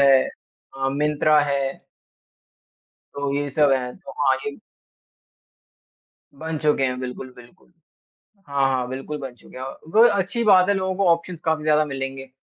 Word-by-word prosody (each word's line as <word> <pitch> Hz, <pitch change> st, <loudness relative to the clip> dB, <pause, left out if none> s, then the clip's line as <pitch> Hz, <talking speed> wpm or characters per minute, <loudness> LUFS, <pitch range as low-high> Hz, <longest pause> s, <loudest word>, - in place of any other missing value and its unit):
है। 140 Hz, 0 st, +6 dB, 0.6 s
अ, 135 Hz, 0 st, 0 dB
मिंत्रा 150 Hz, +1 st, +3 dB
है। 140 Hz, -1 st, -1 dB, 1.3 s
तो 140 Hz, -1 st, -2 dB
ये 145 Hz, 0 st, -1 dB
सब 145 Hz, 0 st, +3 dB
हैं। 125 Hz, -2 st, -1 dB
तो 190 Hz, -1 st, -12 dB
हाँ, 135 Hz, -2 st, +3 dB
यही 145 Hz, +8 st, -5 dB, 1.8 s
बन 160 Hz, 0 st, -4 dB
चुके 150 Hz, -2 st, +1 dB
हैं, 125 Hz, 0 st, -1 dB
बिल्कुल, 130 Hz, 0 st, -6 dB
बिल्कुल। 125 Hz, +8 st, -18 dB, 0.8 s
हाँ, 140 Hz, -1 st, +1 dB
हाँ 130 Hz, -2 st, 0 dB
बिल्कुल 135 Hz, +3 st, -5 dB
बन 135 Hz, -3 st, -7 dB
चुके -, -, -15 dB
हैं। 130 Hz, -, -6 dB
अ, 135 Hz, -, -8 dB, 0.2 s
वो 225 Hz, -, +8 dB
अच्छी 200 Hz, +3 st, 0 dB
बात 190 Hz, -3 st, +5 dB
है 200 Hz, -, +4 dB
लोगों 190 Hz, -1 st, -1 dB
को 195 Hz, -1 st, +1 dB
ऑप्शंज़ 170 Hz, 0 st, -1 dB
काफ़ी 160 Hz, -1 st, 0 dB
ज़्यादा 155 Hz, 0 st, +3 dB
मिलेंगे। 135 Hz, -1 st, -6 dB
145 Hz, 160 wpm, -23 LUFS, 135-160 Hz, 1.8 s, वो